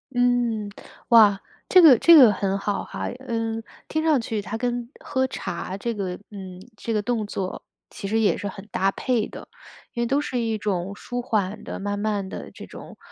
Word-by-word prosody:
嗯， 240 -4 +1 0.4
哇， 210 -4 +6 0.3
这 370 - +7
个 295 -8 +9
这 335 - +8
个 255 -8 +9
很 195 -1 -1
好 200 0 -2
哈， 95 0 -5 0.2
嗯， 225 -1 -2 0.3
听 315 0 -1
上 310 -4 +3
去 225 -2 -3
它 210 +2 -5
跟 240 0 -2
喝 260 -1 0
茶 185 -6 -5
这 235 +4 -3
个， 190 -4 -4
嗯， 190 -3 -9 0.2
这 225 +3 -3
个 210 - +1
动 220 -1 -2
作 190 -2 -4 0.3
其 195 - -7
实 220 +3 +1
也 210 - +2
是 205 - -4
很 195 0 -8
搭 195 +1 +2
配 235 0 -1
的。 - - -11 0.5
因 235 - -2
为 - - +1
都 275 +4 +1
是 255 -4 -3
一 225 -2 -1
种 200 -2 -2
舒 245 +3 -5
缓 210 -3 -2
地、 - - -6
慢 205 +1 -3
慢 205 -2 -1
地 - - -8
这 - - -10
种， - - -11
215 Hz, 210 characters per minute, -24 LUFS, 200-245 Hz, 0.5 s, 个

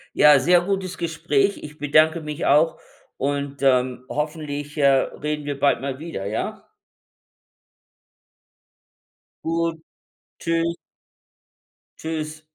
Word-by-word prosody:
Ja, 150 -2 +7
sehr 175 +6 +4
gutes 190 -1 -2
Gespräch. 165 +1 0
Ich 150 0 -9
bedanke 155 +3 +3
mich 150 +1 -4
auch 155 +3 +3 0.4
und, 140 0 -2
ähm, 125 -1 +2
hoffentlich, 150 -1 -4
äh, 140 -2 +4
reden 150 +2 0
wir 145 -1 -4
bald 140 -3 +3
mal 135 0 -4
wieder, 155 -12 -6
ja? 105 +3 -4 2.8
Gut, 165 0 0 0.6
tschü 165 0 0 1.4
tschüss. 155 -1 -4
150 Hz, 100 wpm, -23 LUFS, 140-165 Hz, 2.8 s, Ja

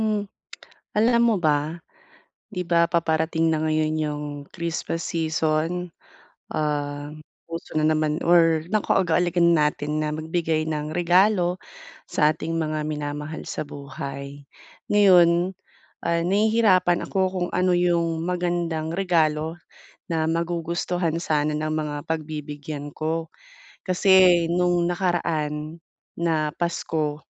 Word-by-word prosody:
Hmm, 215 -2 0 0.7
alam 235 +3 +4
mo 225 - +3
ba, 150 +1 +1 0.7
'di 180 -4 -4
ba, 170 0 +3
paparating 160 -1 +1
na 155 - -1
ngayon 155 0 +1
'yung 150 -1 -3 0.3
Christmas 170 0 -4
season, 160 +1 -1 0.6
ah, 145 -1 -2 0.4
uso 165 0 -7
na 155 - +2
naman 155 -1 +1
or 165 -2 +4
nakaugalian 175 -4 +2
natin 150 0 0
na 155 - -1
magbigay 160 0 -1
ng 150 -1 -3
regalo 180 +1 +3 0.5
sa 150 0 +3
ating 165 +1 -4
mga 155 -1 -1
minamahal 150 +1 -4
sa - - -4
buhay. 140 0 -7 0.5
Ngayon, 180 -3 +5 0.5
ah, 170 0 +1
nahihirapan 200 -3 +3
ako 190 - 0
kung 180 -2 -2
ano 180 0 +2
'yung 170 -2 +1
magandang 175 -3 -1
regalo 165 -3 +1 0.5
na 160 -2 0
magugustuhan 170 0 -1
sana 150 -2 0
ng 155 0 -2
mga 150 -1 -2
pagbibigyan 150 -2 -5
ko, 160 +1 -3 0.6
kasi 185 -2 +5
nung 175 0 +2
nakaraan 165 -3 -2 0.4
na 155 -3 0
Pasko 160 -3 -2
165 Hz, 110 wpm, -24 LUFS, 155-175 Hz, 0.7 s, Ngayon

